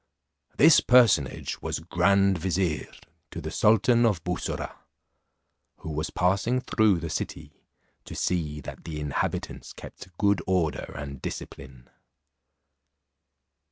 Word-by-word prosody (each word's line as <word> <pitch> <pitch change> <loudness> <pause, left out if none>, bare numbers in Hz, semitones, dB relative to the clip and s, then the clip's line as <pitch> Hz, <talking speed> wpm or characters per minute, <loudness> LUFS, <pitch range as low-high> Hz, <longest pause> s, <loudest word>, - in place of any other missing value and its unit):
This 150 +1 +7
personage 110 - +3
was - - -3
grand 95 +3 +2
vizier, 90 -2 -1 0.4
to - - -7
the - - -6
sultan 115 +3 +4
of 105 -8 +1
Bussorah, 90 +1 -4 1.0
who 80 - -7
was 75 +1 -3
passing 100 +8 +1
through 110 -6 +2
the 85 - -5
city - - -6 0.4
to - - -9
see 75 -4 -2
that - - -9
the 80 -2 -6
inhabitants 75 -2 -3
kept 90 -2 -12
good 100 -3 +2
order 90 -5 0
and 70 -3 -7
discipline. 65 -1 -8
90 Hz, 115 wpm, -26 LUFS, 80-100 Hz, 1.0 s, This